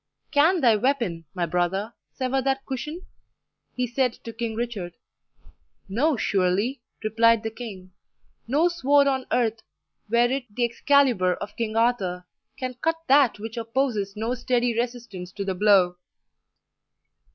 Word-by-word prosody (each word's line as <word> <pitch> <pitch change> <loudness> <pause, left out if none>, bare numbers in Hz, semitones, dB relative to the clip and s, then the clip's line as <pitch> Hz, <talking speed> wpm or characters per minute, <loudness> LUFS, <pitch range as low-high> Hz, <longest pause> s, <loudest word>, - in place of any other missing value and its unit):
"Can 320 +4 +4
thy 235 -4 +5
weapon, 220 -10 -1
my 175 -2 0
brother, 180 +6 -1 0.2
sever 265 +1 -1
that 270 +1 -1
cushion?" 300 +7 -5 0.7
he 250 - 0
said 250 0 0
to 230 - -7
King 230 -1 -3
Richard. 215 -7 -4 0.9
"No, 260 +9 +1
surely," 200 +7 0 0.2
replied 230 +1 +3
the 225 - -3
king; 200 -6 -9 0.6
"no 295 +8 +3
sword 285 -4 +3
on 265 -2 0
earth, 230 -2 +1 0.5
were 240 +2 +3
it 270 -1 -2
the 240 +4 0
Excalibur 235 -7 +3
of 205 - -8
King 225 -2 -3
Arthur, 200 -7 +1 0.3
can 255 -1 -4
cut 325 0 +1
that 275 -5 +5
which 225 +3 -7
opposes 230 -4 -1
no 225 +3 -1
steady 245 -1 0
resistance 235 -6 -4
to 200 - -4
the 190 - -1
blow." 185 -2 +4
235 Hz, 140 wpm, -25 LUFS, 205-260 Hz, 0.9 s, thy